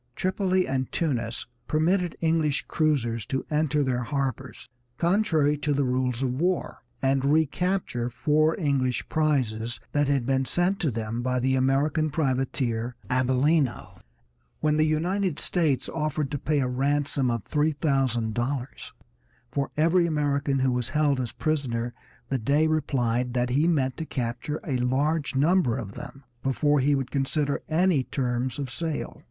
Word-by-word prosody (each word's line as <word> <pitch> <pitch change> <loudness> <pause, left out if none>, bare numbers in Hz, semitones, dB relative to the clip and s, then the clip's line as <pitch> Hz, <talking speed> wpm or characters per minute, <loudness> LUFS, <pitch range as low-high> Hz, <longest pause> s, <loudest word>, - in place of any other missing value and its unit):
Tripoli 185 0 +1
and 130 -1 -2
Tunis 120 -8 -2 0.2
permitted 175 +3 +1
English 160 -3 +1
cruisers 120 -8 0
to 135 - -2
enter 150 -1 +2
their 125 -2 0
harbors, 130 -1 -3 0.3
contrary 165 -6 +2
to 150 0 0
the 140 0 +1
rules 125 -1 0
of 130 +2 -1
war, 180 0 0 0.2
and 135 0 +2
recapture 155 -3 +1
four 155 - +1
English 135 -6 0
prizes 125 -7 0
that 145 -1 +1
had 140 -4 +1
been 135 0 +1
sent 180 +7 +1
to 160 - +1
them 115 0 -3
by 125 0 0
the 130 +1 +1
American 140 +4 +2
privateer 130 -5 -1 0.2
Abellino. 130 +2 +1 0.6
When 150 -1 +1
the 155 0 +3
United 175 +2 0
States 150 -8 0
offered 155 -3 -2
to 145 - -2
pay 150 0 +1
a 130 - 0
ransom 140 +1 +1
of 115 -3 -1
three 150 +1 +1
thousand 135 -7 0
dollars 125 +3 -3 0.6
for 140 +1 -1
every 170 +3 +4
American 145 -3 0
who 130 -1 +2
was 125 0 -1
held 145 -1 +2
as 125 -2 -2
a - - -16
prisoner 120 -6 -1 0.3
the 135 - -1
Dey 145 +7 +2
replied 125 -6 0
that 125 0 +1
he 145 +6 +3
meant 135 -7 +1
to 160 - -4
capture 125 +5 -3
a 135 -5 0
large 140 +5 0
number 145 -3 +3
of 105 -7 -5
them 140 +6 -10 0.2
before 145 +2 +2
he 140 +2 +3
would 135 -2 -3
consider 140 +1 0
any 165 -3 +3
terms 125 -2 -2
of 135 -4 -4
sale. 160 +1 -3
140 Hz, 155 wpm, -26 LUFS, 125-155 Hz, 0.6 s, every